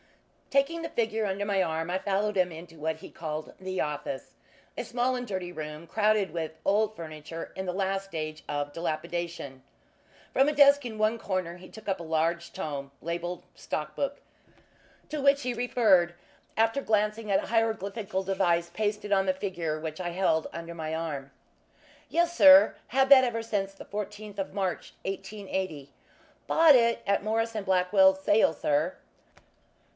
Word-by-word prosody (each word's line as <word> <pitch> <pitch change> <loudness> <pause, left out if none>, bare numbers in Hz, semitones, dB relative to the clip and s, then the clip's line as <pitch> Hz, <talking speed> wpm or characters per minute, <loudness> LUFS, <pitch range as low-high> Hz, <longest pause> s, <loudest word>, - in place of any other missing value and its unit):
Taking 280 +5 +1
the 330 - -4
figure 220 -2 0
under 200 +1 -2
my 200 -2 +1
arm, 160 0 -2
I 185 - +1
followed 205 +2 0
him 180 -2 +2
into 165 0 -11
what 160 +1 -2
he - - -11
called 155 -1 -5
"the 185 0 -4
office" 145 -3 -3 0.4
a - - -3
small 245 +1 0
and 250 0 -3
dirty 185 -3 -4
room, 155 -1 -7
crowded 215 -1 +2
with 160 -2 -4
old 215 +2 +2
furniture 160 -1 -8
in 190 0 -4
the - - 0
last 195 +1 -1
stage 155 -4 -5
of 145 0 -2
dilapidation. 165 -3 -4 0.7
From 270 +2 +4
a - - -1
desk 285 -1 +6
in 225 -3 -5
one 215 +2 +1
corner 185 -4 -2
he 185 +1 -13
took 220 -1 -13
a 190 -3 -1
large 165 +1 0
tome 140 -2 -5
labelled 175 +2 -4
"Stock 150 0 -4
Book," 280 0 -2 0.9
to 300 -2 -4
which 280 0 +4
he 250 0 -1
referred, 215 -8 +3 0.4
after 225 +5 +2
glancing 215 -1 0
at 195 - +4
a - - -7
hieroglyphical 220 -3 -1
device 175 -3 +1
pasted 210 -1 -2
on 195 -1 +2
the 185 - +3
figure 170 -5 -3
which 155 +2 -5
I 175 - -2
held 170 -3 +1
under 170 0 -7
my 160 -1 -4
arm. 145 -4 -4 0.8
"Yes, 345 0 +1
sir 285 -1 +8
had 265 +2 +3
that 270 -2 +9
ever 230 -2 -1
since 200 -3 -2
the 195 - -11
14th 210 0 -6
of 190 - -3
March, 190 -2 -3
1880 190 -7 -4 0.5
bought 320 -3 +7
it 235 -1 +3
at 200 0 +1
Morris 225 +2 0
& - - -9
Blackwell's 190 0 +4
sale, 205 -2 +4
sir." 150 +2 0
190 Hz, 165 wpm, -28 LUFS, 165-220 Hz, 0.9 s, that